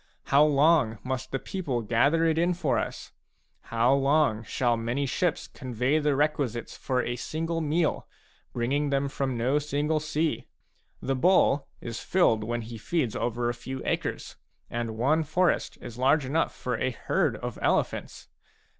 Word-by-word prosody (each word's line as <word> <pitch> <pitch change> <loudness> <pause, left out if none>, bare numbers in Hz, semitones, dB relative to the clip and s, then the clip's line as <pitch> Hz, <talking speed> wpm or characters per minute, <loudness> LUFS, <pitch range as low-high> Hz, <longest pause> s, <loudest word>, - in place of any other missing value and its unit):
How 140 +2 +7
long 145 -5 +4
must 130 -1 -3
the 135 - 0
people 135 -7 -3
gather 140 +9 +3
it 160 0 +2
in 175 +1 +2
for 165 -6 +1
us? - - -5 0.5
How 115 +3 +2
long 140 -4 +2
shall 120 +2 0
many 120 +5 -1
ships 165 +5 -1
convey 130 +2 -1
the 150 -2 +1
requisites 140 -5 -1
for 130 -2 -1
a 120 - -2
single 165 +6 -3
meal, 160 +1 0 0.4
bring 120 +1 -2
ing 145 +1 +1
them 140 0 +1
from 135 -3 -2
no 130 +5 +2
single 150 +1 0
sea? 155 +1 -1 0.6
The 135 - 0
bull 145 -2 +3
is 115 -1 -5
filled 115 - +2
when 120 +2 -2
he 115 0 -8
feeds 125 -1 -1
over 120 0 -1
a 120 - 0
few 130 +2 -6
acres; - - -3 0.3
and 115 -2 -3
one 145 +7 +2
forest 175 +4 +1
is 120 +1 -9
large 135 +2 +3
enough 155 +5 0
for 125 -2 -3
a - - +1
herd 120 - 0
of - - -6
elephants. - - -1
135 Hz, 165 wpm, -27 LUFS, 120-155 Hz, 0.6 s, How